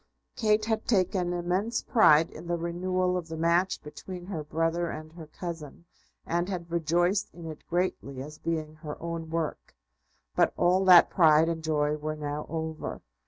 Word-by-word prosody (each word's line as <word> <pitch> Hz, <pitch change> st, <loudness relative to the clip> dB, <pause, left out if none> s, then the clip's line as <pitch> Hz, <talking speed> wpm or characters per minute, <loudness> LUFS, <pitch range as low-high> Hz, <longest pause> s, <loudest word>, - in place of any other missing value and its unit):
Kate 215 Hz, -1 st, +2 dB
had 220 Hz, -1 st, -1 dB
taken 185 Hz, -4 st, +1 dB
immense 180 Hz, +6 st, -1 dB
pride 165 Hz, -9 st, +5 dB
in 160 Hz, +2 st, -10 dB
the 175 Hz, 0 st, 0 dB
renewal 180 Hz, +2 st, -1 dB
of 175 Hz, -2 st, -3 dB
the 160 Hz, -1 st, -6 dB
match 170 Hz, +3 st, +1 dB
between 175 Hz, +4 st, -8 dB
her 170 Hz, -5 st, -4 dB
brother 165 Hz, +3 st, -1 dB
and 155 Hz, 0 st, -7 dB
her 165 Hz, -2 st, -10 dB
cousin, 155 Hz, -, -7 dB, 0.4 s
and 175 Hz, +2 st, -1 dB
had 170 Hz, -3 st, -5 dB
rejoiced 175 Hz, +4 st, +1 dB
in 170 Hz, -1 st, -9 dB
it 155 Hz, -2 st, -8 dB
greatly 170 Hz, -6 st, -2 dB
as 150 Hz, +3 st, -8 dB
being 155 Hz, -2 st, -3 dB
her 150 Hz, -2 st, -7 dB
own 165 Hz, -1 st, -5 dB
work. 160 Hz, -, -3 dB, 0.6 s
But -, -, +3 dB
all 180 Hz, +2 st, +3 dB
that 180 Hz, -2 st, +8 dB
pride 160 Hz, -3 st, +5 dB
and 165 Hz, -1 st, -3 dB
joy 150 Hz, -1 st, +1 dB
were 155 Hz, +1 st, -3 dB
now 150 Hz, 0 st, -4 dB
over. 160 Hz, -1 st, -4 dB
170 Hz, 165 wpm, -28 LUFS, 155-180 Hz, 0.6 s, that